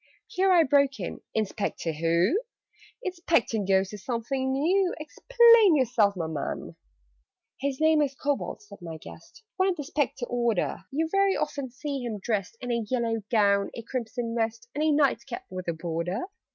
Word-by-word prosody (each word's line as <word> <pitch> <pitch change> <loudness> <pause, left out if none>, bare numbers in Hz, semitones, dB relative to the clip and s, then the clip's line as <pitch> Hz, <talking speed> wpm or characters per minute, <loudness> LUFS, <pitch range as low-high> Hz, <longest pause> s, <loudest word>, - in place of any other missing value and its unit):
Here 385 -4 +1
I 345 -2 +6
broke 280 -2 +3
in 180 - -5
"Inspector 210 -5 -2
who? 170 - +2 0.6
Inspecting 335 - 0
Ghosts 190 0 +2
is 205 - -8
something 260 +2 -2
new! 355 +7 +2
Explain 465 +3 +5
yourself 235 -7 +2
my 170 -3 -2
man!" 160 -3 -4 0.8
"His 275 -1 -2
name 315 -1 +4
is 275 -2 0
Kobold," 285 +8 -2
said 405 - -14
my 165 -2 -7
guest: 460 - -14
"One 380 0 +3
of 370 - 0
the 300 - -5
Spectre 275 -3 -1
order: 235 -7 -1
You'll 320 +4 -1
very 390 +1 +2
often 285 -3 -3
see 275 +2 -5
him 235 -3 -4
dressed 205 0 -2
In 245 - -3
a 235 -1 0
yellow 230 -3 0
gown, 200 -3 +3
a 230 - -6
crimson 235 -1 -4
vest, 230 0 -2
And 295 - -1
a 310 - +3
night 280 -5 +2
cap 240 - -6
with 185 -1 -6
a 170 - 0
border. 170 +5 -3
245 Hz, 170 wpm, -27 LUFS, 210-300 Hz, 0.8 s, I